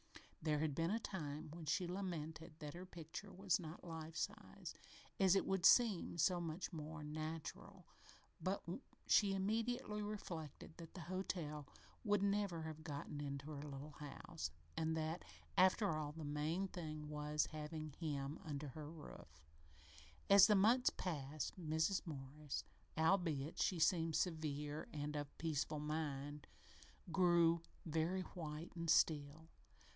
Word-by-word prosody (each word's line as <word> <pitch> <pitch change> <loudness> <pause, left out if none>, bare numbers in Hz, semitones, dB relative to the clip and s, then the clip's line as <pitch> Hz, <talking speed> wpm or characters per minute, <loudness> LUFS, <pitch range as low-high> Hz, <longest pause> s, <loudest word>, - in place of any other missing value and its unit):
There 155 -1 +2
had 155 -2 +1
been 165 +4 +1
a 220 +4 +2
time 155 -7 -4
when 165 -1 -7
she 170 +5 +2
lamented 170 -3 -4
that 150 -2 -6
her 180 +2 -7
picture 180 +3 -7
was 190 -3 +2
not 160 -1 -7
"life 165 -2 -6
sized" - - -4 0.4
as 190 -1 +6
it 195 - +3
would 190 -2 +1
seem 210 -8 +6
so 175 +2 +4
much 170 +3 -3
more 155 0 -5
natural, 155 +1 -5 0.6
but 185 +4 0 0.4
she 200 -2 +5
immediately 210 +2 0
reflected 170 -7 -5
that 165 0 -10
that 180 - -5
hotel 165 -4 -3 0.4
would 205 -3 +3
never 200 -5 +1
have 155 0 -6
gotten 145 -1 -4
into 140 +1 -4
her 145 -2 -4
little 145 0 -6
house, 140 - -5 0.3
and 160 0 +1
that, 160 +2 -1 0.3
after 190 -1 +5
all, 150 -1 -2
the 160 -1 -6
main 155 +6 0
thing 155 -4 -5
was 150 0 +1
having 155 0 -4
"him" 145 -2 -2
under 145 -2 -4
her 155 +4 -7
own 160 - -8
roof. 80 - -11 0.8
As 200 -1 +10
the 210 - +6
months 230 +6 +6
passed 150 -5 -3
Mrs. 160 +3 +2
Morris, 145 0 -4 0.3
albeit 160 -4 +2
she 185 - +3
seemed 165 -1 +3
serene 150 -3 -1
and 150 0 -3
of 145 -1 -4
peaceful 155 -2 0
mind, 150 -1 -3 0.6
grew 170 -1 +5 0.2
very 165 +4 +1
white 160 -2 -6
and 170 -1 -2
still. 155 0 +3
160 Hz, 140 wpm, -41 LUFS, 150-180 Hz, 0.8 s, As